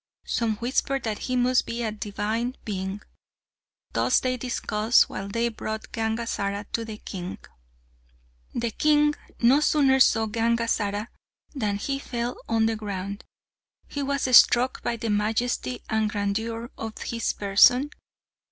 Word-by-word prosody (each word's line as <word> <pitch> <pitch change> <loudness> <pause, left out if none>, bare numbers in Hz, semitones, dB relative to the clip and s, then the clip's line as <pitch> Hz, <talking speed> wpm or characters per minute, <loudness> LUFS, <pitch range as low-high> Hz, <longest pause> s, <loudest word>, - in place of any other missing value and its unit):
Some 225 -2 0
whispered 260 +3 -1
that 220 -2 -2
he 255 - -2
must 250 +1 +2
be 235 +1 -3
a 220 - -1
divine 215 +4 -3
being. 195 0 -4 0.9
Thus - - +3
they 255 -1 -1
discussed, 235 -2 +2
while 195 - -5
they 230 +4 0
brought 220 -1 -6
Gangazara 220 -3 -2
to 230 - 0
the 220 -1 -7
king. 185 -3 -6 1.2
The 235 -1 -1
king 295 +3 +3 0.3
no 255 +4 +6
sooner 280 -3 +3
saw 225 -3 +5
Gangazara 225 -1 0 0.4
than 210 -8 -1
he 275 +6 -2
fell 240 -2 -3
on 225 -1 +3
the 225 0 +1
ground. 200 -2 -5 0.6
He 285 - -4
was 280 +1 -1
struck 250 +2 +6
by 235 - -1
the 225 -1 -2
majesty 210 - -1
and 220 -1 +1
grandeur 225 +3 -2
of 225 -1 -5
his 230 -1 -1
person. 245 +8 +4
225 Hz, 135 wpm, -25 LUFS, 210-245 Hz, 1.2 s, no